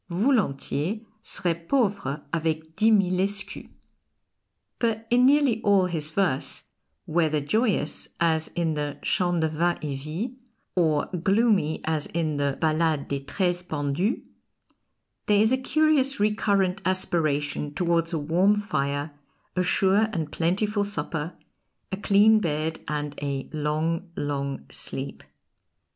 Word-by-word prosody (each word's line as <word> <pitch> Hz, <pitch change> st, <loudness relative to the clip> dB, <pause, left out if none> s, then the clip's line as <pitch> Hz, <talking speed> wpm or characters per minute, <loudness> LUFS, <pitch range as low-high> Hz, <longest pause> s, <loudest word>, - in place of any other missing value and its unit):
("Voulentiers 195 Hz, -, 0 dB, 0.2 s
serais 175 Hz, -5 st, 0 dB
pauvre 200 Hz, -, 0 dB
avec 160 Hz, -1 st, -2 dB
dix 220 Hz, +5 st, +4 dB
mille 185 Hz, -3 st, +3 dB
escus.") 200 Hz, +1 st, -3 dB, 1.1 s
But 225 Hz, -1 st, 0 dB
in 245 Hz, +1 st, +5 dB
nearly 275 Hz, -5 st, +3 dB
all 200 Hz, -3 st, +4 dB
his 160 Hz, -4 st, -2 dB
verse, 170 Hz, -6 st, 0 dB, 0.4 s
whether 155 Hz, -2 st, +1 dB
joyous 170 Hz, -, 0 dB
as 160 Hz, -2 st, +2 dB
in 165 Hz, -2 st, 0 dB
the 145 Hz, -1 st, -3 dB
"Chant 175 Hz, -2 st, +1 dB
de 160 Hz, -, +2 dB
vin 170 Hz, +3 st, 0 dB
et 145 Hz, -2 st, -2 dB
vie," 180 Hz, -, -5 dB, 0.4 s
or 155 Hz, -5 st, +2 dB, 0.2 s
gloomy 195 Hz, -6 st, +2 dB
as 155 Hz, -2 st, -1 dB
in 160 Hz, -3 st, -1 dB
the 140 Hz, -1 st, 0 dB
"Ballade 155 Hz, -2 st, +1 dB
des 140 Hz, -, -1 dB
Treize 175 Hz, +5 st, -1 dB
Pendus," 155 Hz, -, -1 dB, 1.0 s
there 205 Hz, -1 st, +4 dB
is 220 Hz, +2 st, +4 dB
a 260 Hz, -, +3 dB
curious 285 Hz, -2 st, +2 dB
recurrent 200 Hz, -2 st, +1 dB
aspiration 155 Hz, -6 st, 0 dB
towards 170 Hz, 0 st, 0 dB
a 165 Hz, -, -1 dB
warm 180 Hz, +8 st, +2 dB
fire, 145 Hz, -6 st, -2 dB, 0.4 s
a 185 Hz, -, +2 dB
sure 195 Hz, +4 st, +3 dB
and 160 Hz, -7 st, -3 dB
plentiful 205 Hz, +5 st, 0 dB
supper, 160 Hz, -4 st, -2 dB, 0.6 s
a 190 Hz, -, -2 dB
clean 210 Hz, +2 st, +5 dB
bed, 160 Hz, -3 st, -2 dB
and 150 Hz, -1 st, -3 dB
a 140 Hz, -2 st, -3 dB
long, 155 Hz, +4 st, -1 dB
long 140 Hz, -, -3 dB
sleep. -, -, -3 dB
170 Hz, 125 wpm, -26 LUFS, 150-205 Hz, 1.1 s, in